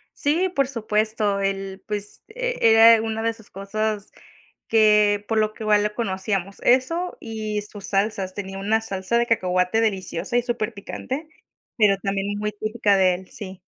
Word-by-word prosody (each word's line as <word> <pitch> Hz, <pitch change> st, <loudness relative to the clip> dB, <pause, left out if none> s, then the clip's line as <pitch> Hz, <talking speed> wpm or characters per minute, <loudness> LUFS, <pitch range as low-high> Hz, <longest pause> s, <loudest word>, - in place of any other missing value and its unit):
Sí, 335 Hz, +6 st, +1 dB
por 275 Hz, -2 st, +2 dB
supuesto. 215 Hz, -4 st, 0 dB
Él, 195 Hz, 0 st, -3 dB
pues, 205 Hz, -1 st, -5 dB
eh, -, -, -3 dB
era 225 Hz, 0 st, +7 dB
una 225 Hz, 0 st, -3 dB
de 230 Hz, -, +2 dB
esas 225 Hz, -2 st, -15 dB
cosas 210 Hz, +1 st, -3 dB, 0.6 s
que 210 Hz, -2 st, +4 dB
por 225 Hz, -, +1 dB
lo 215 Hz, 0 st, +1 dB
que 220 Hz, -, -10 dB
igual 210 Hz, -1 st, +4 dB
lo 210 Hz, 0 st, -2 dB
conocíamos, 195 Hz, -3 st, -2 dB
eso 330 Hz, +9 st, +2 dB
y 215 Hz, -2 st, -4 dB
sus 205 Hz, -1 st, -11 dB
salsas. 195 Hz, -1 st, -1 dB
Tenía 195 Hz, -1 st, -6 dB
una 215 Hz, +3 st, +1 dB
salsa 200 Hz, +1 st, -1 dB
de 235 Hz, -, +1 dB
cacahuate 185 Hz, -2 st, +1 dB
deliciosa 195 Hz, -1 st, -2 dB
y 245 Hz, -, +3 dB
superpicante, 240 Hz, +5 st, -4 dB, 0.5 s
pero 210 Hz, -3 st, +4 dB
también 200 Hz, +1 st, -2 dB
muy 210 Hz, 0 st, -2 dB
típica 215 Hz, -1 st, +1 dB
de 185 Hz, -1 st, +4 dB
él, 185 Hz, +1 st, -9 dB
sí. 190 Hz, -2 st, -9 dB
210 Hz, 160 wpm, -23 LUFS, 195-225 Hz, 0.6 s, era